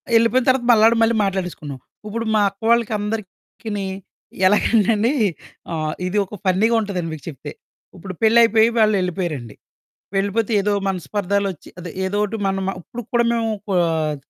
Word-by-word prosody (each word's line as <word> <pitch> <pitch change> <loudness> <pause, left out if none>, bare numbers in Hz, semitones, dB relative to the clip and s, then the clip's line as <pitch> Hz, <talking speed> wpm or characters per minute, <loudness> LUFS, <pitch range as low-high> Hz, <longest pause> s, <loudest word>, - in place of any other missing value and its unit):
యెళ్ళిపోయిన 230 +2 +3
తర్వాత 255 -2 +2
మళ్ళాడ 225 0 +6
మళ్ళీ 225 0 +3
మాట్లాడేసుకున్నాం. 180 -8 -4 0.3
ఉప్పుడు 230 +2 -3
మా 210 - +4
అక్కవాళ్ళకి 225 +3 +1
అందరికిని 210 0 -5 0.6
ఎలాగంటండీ, 220 +3 +3 0.6
ఆ - - -3 0.3
ఇది 200 +3 -2
ఒక 210 - -10
ఫన్నీగుంటదండి 200 -3 +1
మీకు 155 - -9
చెప్తే. 145 0 -8 0.5
ఉప్పుడు 185 +1 -7
పెళ్లయిపోయి 225 0 +5
వాళ్ళెళ్ళిపోయారండి. 180 - 0 0.6
వెళ్ళిపోతే 205 +3 0
ఏదో 205 +1 0 0.2
మనస్పర్ధాలొచ్చి, 195 +1 -2
అదే 175 -2 -7
ఏదోటి 205 +3 -1
మనం 195 0 -1
మ - - 0
ఉప్పుడుకు 240 +5 -9
కూడా 235 0 +3
మేవూ 225 -1 0 0.2
కొ 190 - +1
ఆహ్, 155 -2 -1
205 Hz, 130 wpm, -21 LUFS, 185-225 Hz, 0.6 s, మళ్ళాడ